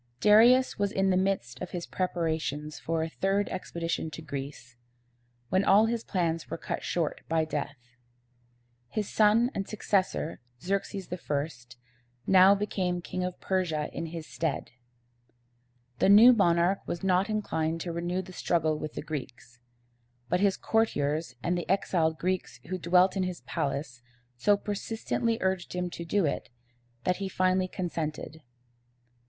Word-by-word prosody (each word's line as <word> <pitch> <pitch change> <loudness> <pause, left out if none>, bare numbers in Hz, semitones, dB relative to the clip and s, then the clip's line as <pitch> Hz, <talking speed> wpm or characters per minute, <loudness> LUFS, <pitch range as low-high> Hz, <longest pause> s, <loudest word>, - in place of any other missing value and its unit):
Darius 235 - +5
was 200 -1 +1
in 195 0 +2
the - - +3
midst 185 -11 -1
of - - -4
his 175 -1 -5
preparations 160 -4 -2
for 165 0 -1
a - - -2
third 195 +4 0
expedition 170 -3 -3
to 160 +1 -9
Greece, 140 -4 -7 0.7
when 185 +2 +2
all 200 +3 +6
his 230 0 -1
plans 165 -4 -1
were - - -4
cut - - -4
short 165 -4 -1
by 160 -1 +2
death. 150 -2 -3 1.1
His 210 - -3
son 220 +4 +4
and 195 - -3
successor, 195 - -1 0.2
Xerx´es 195 0 -3
I., 140 -7 -4 0.5
now 190 +1 +7
became 185 -3 -2
King 185 - -3
of 180 0 -4
Persia 170 -6 -1
in 165 - -4
his 165 -1 -7
stead. 160 -2 -3 1.3
The - - +4
new 225 +5 +9
monarch 175 -2 +3
was 170 - -4
not 190 +2 +2
inclined 165 -7 -1
to 175 - -3
renew 175 +2 -2
the 185 0 -12
struggle 160 -4 0
with 155 - -5
the - - -5
Greeks; 130 -5 -7 0.7
but 180 - +2
his 200 -1 +2
courtiers 155 - 0
and 175 - +1
the 175 -1 -4
exiled 170 -4 +1
Greeks 180 -8 -2
who 185 0 -2
dwelt 180 +3 +4
in 195 - 0
his 185 -1 -3
palace 140 -3 -3 0.3
so 200 +12 +3
persistently 225 +3 -2
urged 190 -2 -1
him 180 0 -2
to 170 - -6
do 185 +2 +1
it, 140 - -2 0.5
that 180 - +1
he 195 -1 -3
finally 185 0 +1
consented. 160 -4 -4
180 Hz, 150 wpm, -28 LUFS, 160-195 Hz, 1.3 s, new